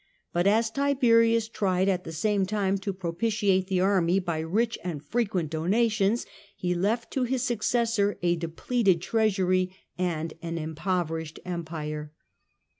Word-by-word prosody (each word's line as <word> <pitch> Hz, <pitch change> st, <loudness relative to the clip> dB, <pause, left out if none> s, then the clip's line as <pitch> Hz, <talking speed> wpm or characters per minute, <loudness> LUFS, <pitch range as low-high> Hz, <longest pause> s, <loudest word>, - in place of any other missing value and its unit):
But 175 Hz, +2 st, +2 dB
as 220 Hz, +2 st, +3 dB
Tiberius 230 Hz, -5 st, +3 dB
tried 190 Hz, -4 st, 0 dB
at 185 Hz, -2 st, 0 dB
the 165 Hz, -, -6 dB
same 195 Hz, +4 st, 0 dB
time 200 Hz, -1 st, 0 dB
to 195 Hz, +1 st, -3 dB
propitiate 190 Hz, +1 st, 0 dB
the 185 Hz, -2 st, +1 dB
army 185 Hz, -2 st, +3 dB
by 175 Hz, -4 st, -1 dB
rich 220 Hz, +9 st, 0 dB
and 160 Hz, -5 st, -5 dB
frequent 190 Hz, -6 st, -1 dB
donations, 210 Hz, +6 st, +1 dB, 0.3 s
he 180 Hz, -1 st, -1 dB
left 210 Hz, +7 st, -1 dB
to 265 Hz, -, -1 dB
his 250 Hz, 0 st, 0 dB
successor 230 Hz, -3 st, +1 dB
a 175 Hz, 0 st, +3 dB
depleted 175 Hz, +4 st, +1 dB
treasury 185 Hz, -3 st, +1 dB, 0.2 s
and 165 Hz, -3 st, -1 dB
an 170 Hz, 0 st, -4 dB
impoverished 160 Hz, 0 st, -2 dB
Empire. 155 Hz, -4 st, -5 dB
190 Hz, 135 wpm, -27 LUFS, 170-220 Hz, 0.3 s, as